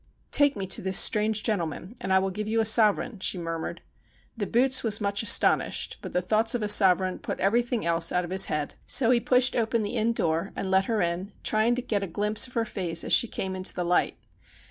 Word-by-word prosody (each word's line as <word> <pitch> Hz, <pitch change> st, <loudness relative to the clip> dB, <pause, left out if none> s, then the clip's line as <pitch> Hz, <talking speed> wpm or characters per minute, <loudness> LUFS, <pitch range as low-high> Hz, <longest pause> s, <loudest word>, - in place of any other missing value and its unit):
' -, -, -41 dB
Take 285 Hz, -1 st, +3 dB
me 195 Hz, -2 st, -5 dB
to 190 Hz, -, 0 dB
this 190 Hz, 0 st, +1 dB
strange 215 Hz, 0 st, +3 dB
gentleman, 185 Hz, 0 st, -4 dB
and 190 Hz, -, -4 dB
I 190 Hz, -, +4 dB
will 190 Hz, 0 st, -1 dB
give 210 Hz, +2 st, -6 dB
yon 225 Hz, +1 st, 0 dB
a -, -, -1 dB
sovereign,' 215 Hz, 0 st, +3 dB
she 185 Hz, -, -1 dB
murmured. 165 Hz, -1 st, -6 dB, 0.5 s
The 210 Hz, -4 st, -4 dB
boots 260 Hz, +2 st, +1 dB
was 220 Hz, -3 st, +1 dB
much 200 Hz, -1 st, -2 dB
astonished, 225 Hz, -, +1 dB
but -, -, -8 dB
the 180 Hz, -, -2 dB
thoughts 220 Hz, +4 st, +1 dB
of 235 Hz, -, -3 dB
a -, -, -1 dB
sovereign 190 Hz, -3 st, +4 dB
put -, -, -6 dB
everything 235 Hz, +2 st, -1 dB
else 165 Hz, 0 st, 0 dB
out 180 Hz, 0 st, 0 dB
of 175 Hz, -, -8 dB
his 190 Hz, +1 st, +3 dB
head; 150 Hz, -2 st, -4 dB
so 245 Hz, -3 st, +3 dB
he 245 Hz, -, +3 dB
pushed 250 Hz, +1 st, +1 dB
open 225 Hz, -1 st, -1 dB
the 210 Hz, +4 st, -4 dB
inn 230 Hz, +1 st, 0 dB
door 165 Hz, -1 st, -2 dB
and 190 Hz, -, -5 dB
led 190 Hz, 0 st, +2 dB
her 220 Hz, -3 st, -1 dB
in, 175 Hz, +3 st, -4 dB
trying 220 Hz, +2 st, +1 dB
to 250 Hz, -, -4 dB
get 210 Hz, -5 st, -2 dB
a 195 Hz, -, -4 dB
glimpse 210 Hz, +6 st, 0 dB
of 250 Hz, -, -18 dB
her 230 Hz, -1 st, 0 dB
face 175 Hz, -6 st, -2 dB
as -, -, 0 dB
she 235 Hz, -, +4 dB
came 190 Hz, -3 st, -5 dB
into 185 Hz, 0 st, -4 dB
the 180 Hz, -, -3 dB
light. 175 Hz, +1 st, 0 dB
205 Hz, 240 wpm, -25 LUFS, 185-225 Hz, 0.5 s, I